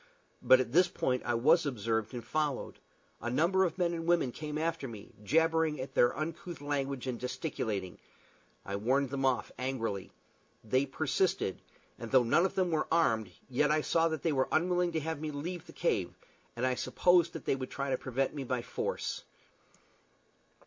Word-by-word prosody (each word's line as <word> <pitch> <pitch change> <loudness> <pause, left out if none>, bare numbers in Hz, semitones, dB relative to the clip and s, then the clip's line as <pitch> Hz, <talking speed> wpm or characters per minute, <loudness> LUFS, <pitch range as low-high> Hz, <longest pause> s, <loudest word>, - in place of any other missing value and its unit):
But 130 - +7
at 125 -2 -1
this 175 +5 +5
point 125 -7 -1
I 120 - +2
was 155 +8 +4
observed 115 -3 -2
and 120 -2 -6
followed. 150 0 -2 0.4
A 120 - -2
number 175 +9 +3
of 175 0 -3
men 175 -2 +1
and 165 0 -4
women 170 -7 +3
came 150 +3 -5
after 165 -3 -1
me, 110 -4 -10
jabbering 160 +4 +2 0.2
their 120 - +3
uncouth 165 +2 -5
language 140 -2 -2
and 125 -2 -3
gesticulating. 110 - -3 0.7
I 100 0 -3
warned 130 +5 +1
them 135 -1 -1
off, 130 -2 +1
angrily. 115 -7 -3 0.5
They 130 +5 +1
persisted, 155 - 0 0.4
and 115 - -6
though 130 0 +5
none 170 +10 +4
of - - -12
them 185 -2 +1
were 155 -1 0
armed, 115 - +2 0.2
yet 135 +3 +2
I 155 0 +3
saw 165 +2 +2
that 160 -3 -3
they 165 - +2
were 130 -2 +1
unwilling 175 +2 +2
to 160 - +1
have 160 -1 -3
me 155 - -3
leave 160 +4 -5
the - - -10
cave, - - -1 0.4
and 120 +2 -1
I 130 - +2
supposed 175 +5 +3
that 165 - -7
they - - +2
would 130 -1 -5
try 140 0 -3
to - - +3
prevent 130 +1 -1
me 145 -2 -4
by 125 -1 -2
force. - - -3
140 Hz, 185 wpm, -31 LUFS, 125-165 Hz, 0.7 s, But